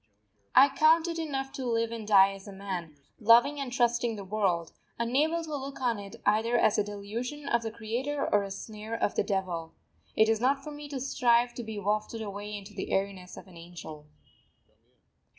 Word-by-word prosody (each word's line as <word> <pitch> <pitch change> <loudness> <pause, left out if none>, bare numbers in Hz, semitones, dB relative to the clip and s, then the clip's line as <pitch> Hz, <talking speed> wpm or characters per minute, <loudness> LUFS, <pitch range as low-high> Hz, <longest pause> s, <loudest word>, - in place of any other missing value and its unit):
I 280 - +8
count 320 +3 +5
it 335 -1 -3
enough 270 -4 -3
to 270 - -5
live 230 -2 0
and 225 -2 -6
die 195 -2 +6
as 195 +1 -11
a - - -7
man, 185 -5 -5 0.2
loving 240 +6 +5
and 270 -3 -4
trusting 240 -2 +1
the 200 - -7
world, 190 -5 0 0.3
unable 295 +8 +1
to 310 -2 -4
look 275 0 -6
on 240 -4 0
it 200 -1 -9
either 220 +3 +3
as 215 -2 +3
a - - +3
delusion 225 +8 -5
of 235 -3 +2
the 225 - -3
Creator 240 +6 -3
or 205 - +5
a 200 - -5
snare 215 +3 -6
of 230 - 0
the - - +1
Devil. 180 -5 -3 0.4
It 220 - +5
is 225 0 +1
not 270 +2 +2
for 300 - -7
me 295 0 -9
to 280 -2 -4
strive 245 -2 +2
to 240 - -6
be 220 -1 -6
wafted 215 +2 -1
away 205 0 -5
into 200 +1 -11
the 195 - -5
airiness 190 -2 -2
of - - -10
an 185 -3 -15
Angel. 165 -3 -10
225 Hz, 200 wpm, -29 LUFS, 200-260 Hz, 0.4 s, I